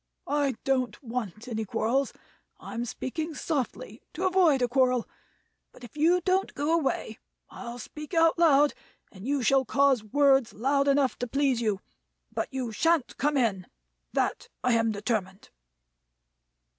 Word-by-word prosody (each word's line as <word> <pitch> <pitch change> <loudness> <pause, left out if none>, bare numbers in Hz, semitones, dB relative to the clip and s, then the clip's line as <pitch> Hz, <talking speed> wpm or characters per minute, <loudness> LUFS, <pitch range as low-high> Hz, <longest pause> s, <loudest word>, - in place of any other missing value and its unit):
I 285 -3 0
don't 260 -2 0
want 230 -2 -5
any 220 -2 -2
quarrels; 240 +6 0 0.5
I'm 235 +1 -5
speaking 310 +7 -4
softly 255 -8 -3
to 365 +5 -3
avoid 355 -8 +4
a - - +3
quarrel; 250 -1 +2 0.6
but - - -17
if 240 - -12
you 335 +4 +3
don't 375 +2 0
go 295 +3 0
away, 275 -8 -1 0.3
I'll 235 0 -7
speak 300 +7 -8
out 330 0 +4
loud, 295 -3 +5 0.4
and 195 +4 -10
you 280 -2 0
shall 270 +3 +4
cause 265 -1 +2
words 270 +2 +3
loud 275 +5 +1
enough 275 -2 +2
to 245 - -2
please 270 -1 +1
you. 210 -4 0 0.5
But - - -2
you 255 -3 -3
shan't 325 +4 +1
come 295 0 +1
in, 205 -8 0 0.5
that - - -1 0.2
I 250 - +3
am 225 -1 +2
determined." 205 -2 -3
265 Hz, 145 wpm, -27 LUFS, 230-290 Hz, 0.6 s, loud